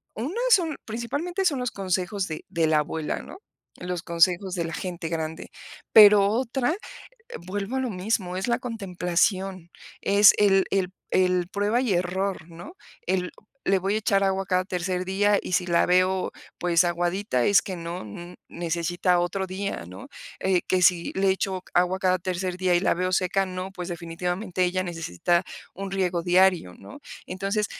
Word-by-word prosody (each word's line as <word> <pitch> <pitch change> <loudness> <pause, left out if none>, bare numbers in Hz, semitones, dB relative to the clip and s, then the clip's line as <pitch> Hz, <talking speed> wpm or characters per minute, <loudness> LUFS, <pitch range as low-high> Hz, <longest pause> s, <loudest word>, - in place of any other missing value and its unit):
una 255 +10 -4 0.2
es 435 - +7
un, 325 -4 -3
principalmente, 285 - -3
son 285 -7 +2
los 250 -1 -2
consejos 190 0 -2
de 155 -1 -6
de 165 -2 +1
la 155 -1 +3
abuela, 150 +1 -3
¿no? - - -11 0.4
Los 180 -1 -4
consejos 180 +2 +2
de 170 - -1
la 165 - -5
gente 175 -2 -5
grande, 160 -1 -4 0.4
pero 205 -2 +8
otra, 250 +6 0 0.7
vuelvo 205 +6 -3
a 265 - 0
lo 255 - -2
mismo, 185 -1 -2
es 190 - -3
la 235 - +2
contemplación, 185 -4 -1 0.3
es 200 0 +6
el 195 -2 +4
el 190 -2 0 0.2
el 180 -1 +2
prueba 205 +5 0
y 245 -6 0
error, 180 -1 -2
¿no? 170 - -10 0.3
El 180 -1 0 0.4
le 195 - +3
voy 195 +3 -1
a - - +1
echar 195 -2 +2
agua 195 0 0
cada 185 -1 +1
tercer 180 0 -2
día 205 +2 +2
y - - -6
si 180 - +2
la 170 -1 +3
veo, 185 +1 +2 0.3
pues, 175 0 +3
aguadita 175 - 0
es 200 - +5
que 190 - -5
no 170 -2 -6 0.4
necesita 175 +1 0
otro 185 +2 -2
día, 190 - -4
¿no? 90 +1 -11 0.3
Eh 190 -2 +2
que 185 -1 +2
si 175 -1 +3
le 195 0 +2
echo 190 -1 -2
agua 180 +1 +2
cada 185 -1 +2
tercer 185 0 -3
día, 185 -1 +2
y 175 - +3
la - - +2
veo 185 +1 -1
seca, 190 +1 +1
no 185 +1 -5
pues, 180 -1 -7
definitivamente, 175 +3 -3
ella 185 +1 0
necesita 170 - -1 0.3
un 195 +1 -6
riego 180 -3 0
diario, 180 - +3
¿no? 285 - -12 0.3
Entonces 195 +3 -2
185 Hz, 175 wpm, -25 LUFS, 175-200 Hz, 0.7 s, pero